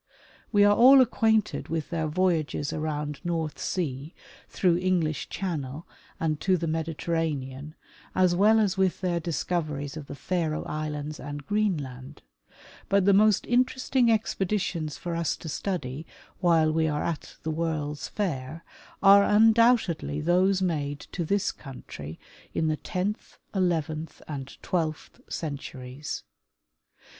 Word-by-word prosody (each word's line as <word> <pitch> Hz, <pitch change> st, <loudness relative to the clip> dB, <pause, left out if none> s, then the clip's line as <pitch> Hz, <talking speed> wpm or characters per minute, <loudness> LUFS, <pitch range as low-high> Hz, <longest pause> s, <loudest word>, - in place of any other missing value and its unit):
We 205 Hz, -2 st, +5 dB
are 205 Hz, 0 st, +6 dB
all 260 Hz, +4 st, +8 dB
acquainted 220 Hz, -4 st, +2 dB
with 160 Hz, -2 st, -3 dB
their 160 Hz, -2 st, -1 dB
voyages 160 Hz, -3 st, 0 dB
around 150 Hz, -2 st, -3 dB
North 165 Hz, -4 st, -2 dB
sea 150 Hz, -3 st, -3 dB, 0.3 s
through 175 Hz, -2 st, +2 dB
English 175 Hz, -5 st, 0 dB
channel 155 Hz, -5 st, -4 dB, 0.3 s
and, 155 Hz, -2 st, 0 dB
to 190 Hz, -1 st, +3 dB
the 170 Hz, -, -3 dB
Mediterranean, 155 Hz, -3 st, -2 dB, 0.4 s
as 185 Hz, -1 st, +4 dB
well 215 Hz, +4 st, +5 dB
as 200 Hz, -3 st, +1 dB
with 190 Hz, -1 st, +1 dB
their 175 Hz, -2 st, 0 dB
discoveries 155 Hz, -3 st, -2 dB
of 150 Hz, -3 st, -7 dB
the -, -, -7 dB
Faroe 160 Hz, -1 st, -1 dB
islands 150 Hz, 0 st, -4 dB
and 145 Hz, 0 st, -7 dB
Greenland; 145 Hz, -10 st, -2 dB, 0.7 s
but 195 Hz, -1 st, +3 dB
the 200 Hz, -, +6 dB
most 210 Hz, 0 st, +4 dB
interesting 255 Hz, 0 st, +2 dB
expe 220 Hz, -4 st, +1 dB
ditions 175 Hz, -6 st, -2 dB
for 175 Hz, -1 st, -4 dB
us 170 Hz, -2 st, -1 dB
to -, -, -9 dB
study 155 Hz, -4 st, -3 dB, 0.3 s
while 165 Hz, -3 st, +4 dB
we 160 Hz, 0 st, +2 dB
are 150 Hz, -1 st, -1 dB
at 165 Hz, -3 st, -4 dB
the 160 Hz, -, -1 dB
World's 155 Hz, -2 st, -2 dB
Fair 160 Hz, -5 st, -3 dB, 0.4 s
are 200 Hz, 0 st, +8 dB
undoubtedly 220 Hz, -7 st, +4 dB
those 185 Hz, +4 st, +2 dB
made 145 Hz, -5 st, -1 dB
to 175 Hz, -, -2 dB
this 200 Hz, +4 st, +1 dB
country 80 Hz, -, -9 dB, 0.4 s
in 160 Hz, -, +1 dB
the 155 Hz, -, 0 dB
tenth, 190 Hz, +7 st, -4 dB, 0.2 s
eleventh 165 Hz, -4 st, -1 dB
and 140 Hz, -3 st, -6 dB
twelfth 160 Hz, -4 st, -2 dB
centuries. 140 Hz, -2 st, -5 dB
165 Hz, 130 wpm, -27 LUFS, 150-190 Hz, 0.7 s, all